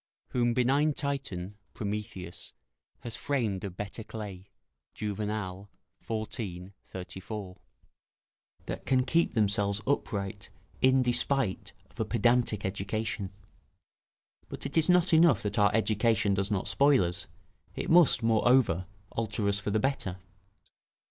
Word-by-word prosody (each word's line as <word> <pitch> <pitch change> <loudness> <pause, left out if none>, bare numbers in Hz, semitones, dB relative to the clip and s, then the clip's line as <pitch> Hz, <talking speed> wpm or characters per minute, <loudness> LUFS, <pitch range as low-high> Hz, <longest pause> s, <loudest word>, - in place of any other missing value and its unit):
["Whom 120 -1 +1
benign 140 +5 +3
Titan 120 -10 -3 0.2
(Prometheus) 100 -4 -5 0.5
has 120 -1 -5
framed 120 -8 -1
of 95 -2 -6
better 105 +2 -5
clay." 100 -4 -8 0.5
Juvenal, 105 -2 -3 0.3
xiv. 105 -5 -4
34.] 95 +1 -7 1.1
that - - -6
can 130 -1 +3
keep 165 +3 +2
themselves 100 -2 +1
upright 100 -7 -2 0.3
in 130 0 +5
despite 125 -3 0 0.2
of - - -21
a - - +1
pedantic 120 -4 +2
education. 100 +1 -3 1.2
But - - -6
it - - -5
is 160 +1 +3
not 180 0 +4
enough 165 -1 +5
that 105 0 -1
our 100 0 +6
education 110 -1 +2
does 100 +1 0
not 100 -3 -1
spoil 140 -6 +5
us; 90 +2 -3 0.5
it - - -3
must, 165 -8 +6
moreover, 115 -5 +3 0.2
alter 110 -2 -2
us 100 0 +1
for 105 - -3
the 105 - +2
better. 105 -7 -1
105 Hz, 120 wpm, -29 LUFS, 100-125 Hz, 1.2 s, our